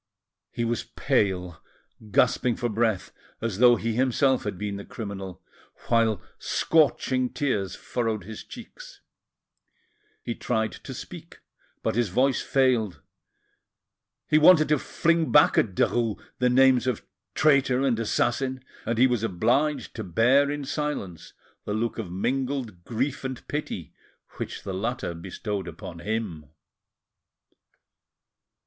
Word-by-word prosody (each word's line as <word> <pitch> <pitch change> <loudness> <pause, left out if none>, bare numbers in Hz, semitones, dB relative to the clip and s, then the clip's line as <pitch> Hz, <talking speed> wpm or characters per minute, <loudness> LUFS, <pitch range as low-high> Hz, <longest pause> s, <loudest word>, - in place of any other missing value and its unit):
He 120 - -2
was 115 0 -1
pale, 90 -4 0 0.5
gasping 120 +3 +2
for 120 - -2
breath, 110 -3 0 0.3
as 110 -3 -3
though 120 0 +7
he 115 0 -2
himself 130 +1 +2
had 105 -3 -3
been 100 0 -3
the 100 - -7
criminal, 100 -4 -7 0.5
while 115 -4 +3 0.2
scorching 130 -5 +2
tears 105 - -1
furrowed 115 -4 -2
his 110 +3 -8
cheeks. - - -12 1.2
He - - -2
tried 110 -2 -1
to - - -9
speak, - - -10 0.5
but - - 0
his 120 -1 +1
voice 130 +7 +2
failed; 125 -8 +1 1.2
he 155 - +4
wanted 155 -1 +7
to 150 -2 +3
fling 165 -1 +1
back 150 - +6
at 95 -5 +2
Derues 115 -1 +1 0.2
the 125 0 +3
names 130 0 +5
of 125 -4 -1 0.3
traitor 135 -4 +3
and 125 -4 +1
assassin, 130 +3 0 0.2
and 115 - 0
he 125 - +6
was 125 -4 +1
obliged 125 - 0
to 110 - -3
bear 120 +10 +3
in 145 -1 -3
silence 145 - -4 0.3
the 105 - -3
look 115 +1 -2
of 95 -6 -5
mingled 125 -1 -2
grief 130 +5 -2
and 130 -2 -6
pity 150 +1 -4 0.4
which - - -5
the 95 - -4
latter 115 0 -2
bestowed 95 +3 -5
upon 85 0 -8
him. 95 -6 -3
120 Hz, 130 wpm, -26 LUFS, 105-135 Hz, 1.2 s, though